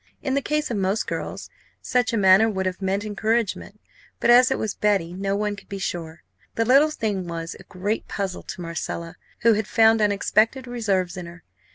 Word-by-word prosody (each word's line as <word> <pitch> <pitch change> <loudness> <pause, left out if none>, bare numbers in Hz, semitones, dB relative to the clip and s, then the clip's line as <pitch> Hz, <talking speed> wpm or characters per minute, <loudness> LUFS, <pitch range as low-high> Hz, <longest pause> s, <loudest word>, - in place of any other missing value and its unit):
In 265 - -1
the 280 - +1
case 300 0 -1
of 225 - -1
most 195 +2 0
girls, - - -5 0.3
such 245 -2 0
a 230 - 0
manner 195 +2 +6
would 190 -3 -2
have 185 +1 -3
meant 195 +2 -1
encouragement; 215 +1 -2 0.4
but, 240 - +4
as 250 +1 +7
it 265 - 0
was 215 - -2
Betty, 195 -5 0
no 195 +1 -2
one 210 0 -1
could - - -15
be 200 - -5
sure. 170 -3 -5 0.3
The 225 - +1
little 275 +6 +5
thing 205 - -3
was 165 -1 -5
a - - -12
great 200 +4 -3
puzzle 195 -3 -4
to - - -8
Marcella, 170 0 -5 0.3
who 230 0 +5
had 215 0 -1
found 225 0 +4
unexpected 215 +5 +2
reserves 200 -7 -1
in 180 -1 -6
her. 170 -1 -13
205 Hz, 200 wpm, -23 LUFS, 185-225 Hz, 0.4 s, as